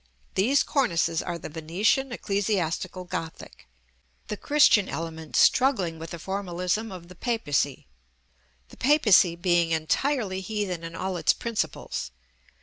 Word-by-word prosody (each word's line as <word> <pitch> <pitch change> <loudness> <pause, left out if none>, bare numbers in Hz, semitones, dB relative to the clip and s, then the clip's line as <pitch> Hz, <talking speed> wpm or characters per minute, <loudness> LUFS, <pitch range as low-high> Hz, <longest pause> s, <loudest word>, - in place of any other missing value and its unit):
These 250 +9 +3
cornices 170 - +1
are 175 -1 -4
the - - -8
Venetian 175 - 0
Ecclesiastical 190 -5 -2
Gothic; 165 - -7 0.6
the 210 - -2
Christian 255 -6 +4
element 160 -1 -6
struggling 195 -12 +3
with 165 0 -7
the 170 - -6
Formalism 190 +3 -2
of 180 -2 -9
the 180 - -12
Papacy, 155 - -1 0.8
the - - -15
Papacy 225 - +5
being 175 -1 +2
entirely 190 - 0
heathen 190 -4 -3
in 165 0 -7
all 185 0 -3
its - - +3
principles. 230 -2 -3
185 Hz, 125 wpm, -26 LUFS, 165-215 Hz, 0.8 s, Papacy